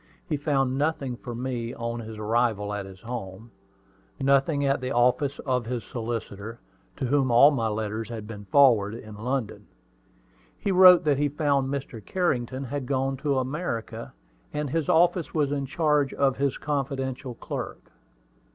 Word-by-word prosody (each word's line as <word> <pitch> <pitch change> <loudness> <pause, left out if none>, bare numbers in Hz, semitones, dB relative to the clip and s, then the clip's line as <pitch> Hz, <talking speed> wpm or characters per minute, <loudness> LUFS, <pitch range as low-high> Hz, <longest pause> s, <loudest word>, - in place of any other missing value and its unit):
He 155 - 0
found 135 -3 0
nothing 145 -4 -1
from 120 0 -7
me 120 -2 -3
on 115 0 -4
his 110 -1 -8
arrival 110 -1 0
at 100 -1 -4
his 95 0 -13
home, 115 -2 -7 0.7
nothing 140 +2 +2
at 135 -1 +1
the 130 - -3
office 125 +4 +2
of 125 -4 0
his 120 -2 -3
solicitor, 115 -1 -5 0.4
to 135 - -2
whom 135 0 +2
all 120 +5 +7
my 115 -6 0
letters 110 +1 -3
had 110 -3 -6
been 105 -2 -9
forwarded, 115 -3 +4
in 110 - -10
London. 125 +2 -3 0.9
He 200 - -1
wrote 180 -1 +8
that 145 -3 +2
he 145 0 +2
found 140 -2 +1
Mr. 130 -6 -5
Carrington 130 - -1
had 135 0 -4
gone 135 0 0
to 140 0 0
America, 130 -3 -3 0.4
and 150 -2 -3
his 165 -2 -1
office 170 0 +3
was 145 -3 +1
in 140 -2 -2
charge 150 0 +1
of 135 -2 +2
his 140 -1 0
confidential 135 -3 -3
clerk. - - -6
130 Hz, 160 wpm, -26 LUFS, 115-140 Hz, 0.9 s, wrote